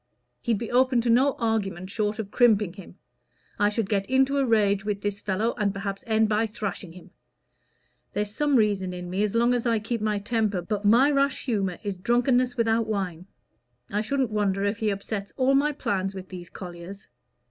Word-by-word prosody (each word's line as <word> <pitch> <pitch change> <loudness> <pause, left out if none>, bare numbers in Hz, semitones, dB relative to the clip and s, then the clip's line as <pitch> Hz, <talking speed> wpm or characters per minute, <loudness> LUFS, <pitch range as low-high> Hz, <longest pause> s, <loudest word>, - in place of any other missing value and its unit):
He'd 230 -4 0
be 230 +2 -5
open 255 0 +3
to 235 0 +1
no 260 +4 +4
argument 200 -5 -2
short 210 -1 -1
of 210 -3 -5
crimping 215 -7 +3
him. 195 -1 -12 0.6
I 205 0 +4
should 210 -1 -2
get 200 -1 -1
into 265 +2 +3
a 275 - +2
rage 205 -3 +2
with 205 -1 -2
this 205 -1 -3
fellow, 210 +4 0
and 205 -1 +2
perhaps 195 0 -4
end 220 0 +3
by 215 +1 +1
thrashing 200 -5 -5
him. 180 0 -14 1.0
There's 205 0 -2
some 295 +2 +1
reason 200 -5 +1
in 180 0 -7
me 190 +2 -1
as 210 +1 0
long 235 +1 +3
as 245 0 0
I 230 -1 +2
keep 225 +1 -3
my 215 -1 0
temper, 205 -3 -1
but 210 +2 -3
my 245 +8 +5
rash 275 -1 +1
humor 195 -8 -1
is 200 -3 -3
drunkenness 245 +4 +1
without 225 -1 +1
wine. 185 -4 -3 0.6
I 210 - 0
shouldn't 260 +1 -1
wonder 200 -2 0
if 205 +2 -1
he 220 - +1
upsets 200 0 -4
all 265 0 +3
my 285 +2 +3
plans 195 -8 -2
with 185 -1 -8
these 175 -2 -9
colliers. 180 +2 -9
210 Hz, 195 wpm, -26 LUFS, 195-235 Hz, 1.0 s, my